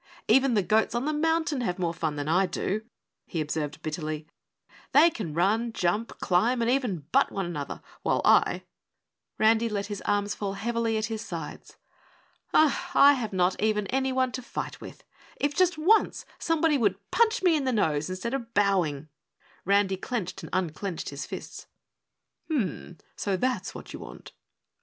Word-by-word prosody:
"Even 260 +1 +4
the 205 - +3
goats 220 +5 +2
on 240 +3 -1
the 305 - 0
mountain 320 -2 +1
have 180 -6 -1
more 170 -2 -1
fun 160 -3 -2
than 145 0 -4
I 185 +4 +3
do," 195 +4 -2 0.5
he 165 - -3
observed 150 -1 -3
bitterly. 155 -1 -4 0.7
"They 325 +4 +7
can 175 - -5
run, 215 +7 +2
jump, 205 +6 -1
climb 225 +8 +2
and 235 +1 +2
even 230 - -1
butt - - +3
one 195 -2 -2
another, 150 -5 -5 0.2
while - - 0
I - - +4 0.4
" - - -59
Randy 225 +1 +3
let 205 -2 -2
his 200 - -6
arms 205 0 0
fall 200 -2 -3
heavily 230 +2 -1
at 215 - 0
his 220 -1 -4
sides. - - -7 0.7
"I 285 -1 +5
have 235 -6 -3
not 185 -1 +1
even 210 -1 +1
anyone 260 -1 +1
to 255 - -5
fight - - -6
with. - - -11 0.4
If 290 0 0
just 360 -3 +3
ONCE 380 +8 +3
somebody 320 -3 +2
would 200 -3 -1
punch 450 -4 +2
me 350 -3 +5
in 290 -3 0
the 260 - +1
nose 160 -9 +1
instead 185 +7 -4
of 235 -4 -5
bowing." 180 -8 +1 0.6
Randy 200 0 +3
clenched 190 -3 -4
and 160 - -8
unclenched 180 0 -2
his 140 +1 -6
fists. - - -8 0.8
"Hm 300 -8 +1 0.3
mm! - - -32 0.2
So 195 -2 -1
that's 235 -3 -1
what - - -9
you - - -7
want!" - - -11
210 Hz, 170 wpm, -27 LUFS, 180-255 Hz, 0.8 s, They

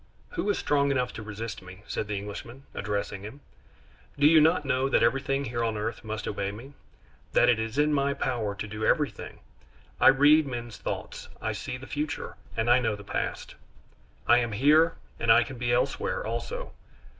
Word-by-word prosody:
"Who 345 - -2
is 205 - +2
strong 140 -1 +2
enough 125 -2 0
to - - -7
resist 110 +1 -6
me?" 90 +2 -12
said 105 - -3
the 105 -1 -2
Englishman, 110 +6 -8
addressing 100 -1 -3
him. 110 +8 -9 0.8
"Do 145 - +3
you 155 +1 +7
not 155 -1 +3
know 135 0 +1
that - - +3
everything 135 +3 +1
here 120 -1 -2
on 110 -2 -1
earth 110 +2 -4
must 110 -1 -5
obey 100 -1 -2
me, 120 +7 -11 0.6
that 120 - +5
it 120 -2 +3
is 110 +3 -3
in 150 +1 +3
my 140 0 +1
power 115 -7 -2
to 105 - -5
do 105 +1 -6
everything? - - 0 0.6
I - - +6
read 145 +3 +6
men's 120 -3 -6
thoughts, - - -5
I - - -2
see 125 - -5
the 130 - -10
future, 145 +2 -4 0.2
and 115 +1 0
I 120 +1 +6
know 110 -4 0
the 100 - -11
past. - - -4 0.7
I 120 +1 +6
am 120 -2 -2
here, 150 +8 +4 0.2
and - - +3
I - - +7
can - - -9
be - - 0
elsewhere - - 0
also. - - -4
125 Hz, 190 wpm, -27 LUFS, 110-145 Hz, 0.8 s, you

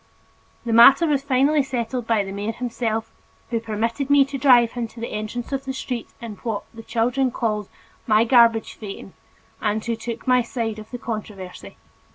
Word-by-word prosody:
The 230 - -1
matter 270 +8 +8
was 290 -4 +1
finally 280 +2 +2
settled 250 -2 -3
by 225 -3 +2
the 195 - -7
mayor 205 +3 -3
himself, 225 -2 -3 0.4
who 230 - +1
permitted 230 +4 -2
me 285 -1 +6
to 275 0 -5
drive 245 -4 +5
him 240 -2 -3
to 230 - -14
the 230 - -4
entrance 215 +4 -5
of 270 0 -3
the 265 - -3
street 250 -3 -5
in 225 -4 -8
what 220 -4 -4
the 225 - -9
children 240 +4 0
called 215 -4 -2 0.4
my 215 0 +5
"garbage 230 -2 +4
phaeton" 195 -2 -9 0.5
and 215 0 -1
who 235 -1 -1
took 230 +1 -6
my 250 -1 +4
side 230 -2 -3
of 215 - -11
the 245 - -6
controversy. 210 -6 -7
230 Hz, 185 wpm, -22 LUFS, 220-255 Hz, 0.5 s, matter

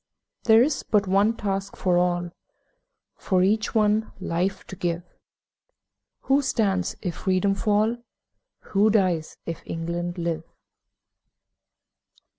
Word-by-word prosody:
There 225 0 +7
is 285 +1 0
but 210 -2 +1
one 200 +4 +3
task 195 -1 -3
for 180 -2 +1
all 175 0 +1
One - - -5 0.3
life - - -49
for 185 -2 +2
each 215 +3 +2
to 195 -4 -1
give 175 -1 -2 1.2
Who 275 +1 +2
stands 200 -9 0
if 175 -4 -3
Freedom 190 +1 +1
fall? 210 +3 +1 0.8
Who 205 +2 +4
dies 185 -7 +1
if 165 -1 -5
England 170 +2 -4
live? 165 -2 -2
195 Hz, 110 wpm, -25 LUFS, 175-215 Hz, 1.2 s, There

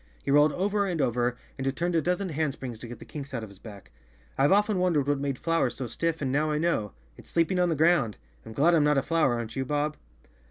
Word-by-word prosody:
He 140 - 0
rolled 145 +1 +5
over 200 +2 0
and 175 -4 -2
over 125 -2 0 0.2
and 135 0 -2
turned 175 +1 0
a 165 - +3
dozen 180 +4 -1
handsprings 140 -6 -3
to 120 - -8
get 120 0 -8
the - - -12
kinks 140 -2 -7
out 115 - -3
of 110 - -8
his 100 -1 -16
back. 100 - -12 0.4
"I've 140 +2 +3
often 205 0 +3
wondered 165 -6 +1
what 145 -1 +1
made 140 -2 -2
flowers 165 -5 0
so 130 - -4
stiff 165 +7 -2
and 130 - -1
now 150 +3 +1
I 150 - 0
know. 150 - 0 0.2
It's - - -13
sleeping 170 +2 +1
on 180 -1 +3
the 165 - +1
ground. 150 -8 +3 0.3
I'm 110 - -10
glad 160 +9 +3
I'm 160 -3 +4
not 150 -1 +3
a 135 - +2
flower, 155 -6 +2
aren't 115 -1 -5
you, 135 - -1
Bob?" 150 +2 -1
145 Hz, 250 wpm, -27 LUFS, 125-165 Hz, 0.4 s, rolled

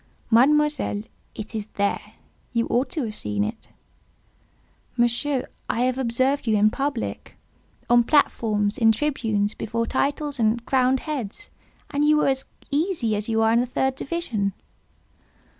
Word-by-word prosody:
"Mademoiselle, 290 -2 +3 0.3
it 215 +1 -7
is 215 -2 -4
there. 200 0 -1 0.4
You 230 -1 +1
ought 250 +3 +1
to 305 - -2
have 220 -2 -4
seen 105 - -2
it." 105 - -5 1.3
"Monsieur, 245 +3 +1 0.2
I 235 - 0
have 255 +1 +1
observed 260 +2 +1
you 215 -1 +3
in 210 +1 +4
public—on 245 -2 -2
platforms, 215 -8 +2
in 225 -1 +6
tribunes, 220 -6 0
before 230 +1 -2
titles 285 +2 -1
and 225 +1 +1
crowned 260 0 +2
heads—and 290 - -6
you 300 0 +5
were 300 - +3
as 265 0 -1 0.3
easy 290 - 0
as 210 +2 -3
you 225 0 +2
are 225 0 +4
in 235 - +4
the 245 - 0
third 265 +1 0
division." 245 - -2
240 Hz, 140 wpm, -24 LUFS, 220-280 Hz, 1.3 s, in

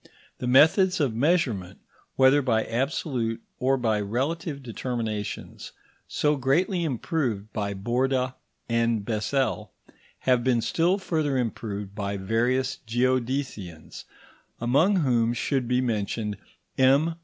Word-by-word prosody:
The 125 - -3
methods 180 +9 +5
of 140 -7 +1
measurement, 120 - 0 0.4
whether 135 +2 +5
by 115 -4 +1
absolute 120 -2 -2 0.2
or 135 +1 +2
by 110 -4 +1
relative 140 +7 -2
determinations, 115 -3 -5 0.3
so 150 0 +1
greatly 170 - +1
improved 125 - -2
by 100 -1 -2
Borda 125 +5 0 0.3
and 115 -2 +1
Bessel, 110 0 -1 0.5
have 125 -2 +2
been 125 -2 +2
still 165 - +1
further 155 -8 -1
improved 105 -4 -3
by 100 -1 -3
various 125 +6 0
geodesians, 120 - -2 0.5
among 140 - +3
whom 120 -8 +2
should 130 +1 -1
be 125 +1 +2
mentioned 105 -3 -2 0.4
M. 140 +5 +4
125 Hz, 110 wpm, -26 LUFS, 110-140 Hz, 0.5 s, methods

